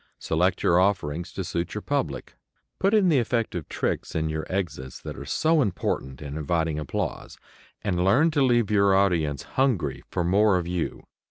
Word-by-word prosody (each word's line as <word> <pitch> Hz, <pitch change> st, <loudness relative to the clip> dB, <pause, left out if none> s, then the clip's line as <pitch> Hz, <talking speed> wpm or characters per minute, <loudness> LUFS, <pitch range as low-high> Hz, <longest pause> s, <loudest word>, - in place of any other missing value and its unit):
Select 90 Hz, +3 st, 0 dB
your 85 Hz, -, +4 dB
offerings 90 Hz, -4 st, 0 dB
to 95 Hz, -, -3 dB
suit 85 Hz, -1 st, -3 dB
your -, -, -4 dB
public. -, -, -2 dB, 0.4 s
Put 195 Hz, +3 st, +3 dB
in 200 Hz, -4 st, +4 dB
the 150 Hz, -5 st, +4 dB
effective 115 Hz, -, -2 dB
"tricks" -, -, -2 dB
in 80 Hz, 0 st, 0 dB
your 80 Hz, 0 st, -3 dB
exits 75 Hz, -9 st, -3 dB
that -, -, -7 dB
are -, -, -8 dB
so 160 Hz, -1 st, +2 dB
important 75 Hz, -, -2 dB
in 70 Hz, 0 st, -6 dB
inviting 80 Hz, 0 st, -1 dB
applause. 75 Hz, -, -4 dB, 0.5 s
And 90 Hz, -3 st, 0 dB
learn 135 Hz, -, +4 dB
to 150 Hz, -2 st, +1 dB
leave 120 Hz, -5 st, +3 dB
your 100 Hz, -2 st, +4 dB
audience 85 Hz, -8 st, +1 dB
"hungry" 105 Hz, -, 0 dB
for 90 Hz, -, -1 dB
more 100 Hz, +3 st, +4 dB
of 90 Hz, -, -2 dB
you. 90 Hz, -1 st, -3 dB
90 Hz, 175 wpm, -25 LUFS, 80-110 Hz, 0.5 s, your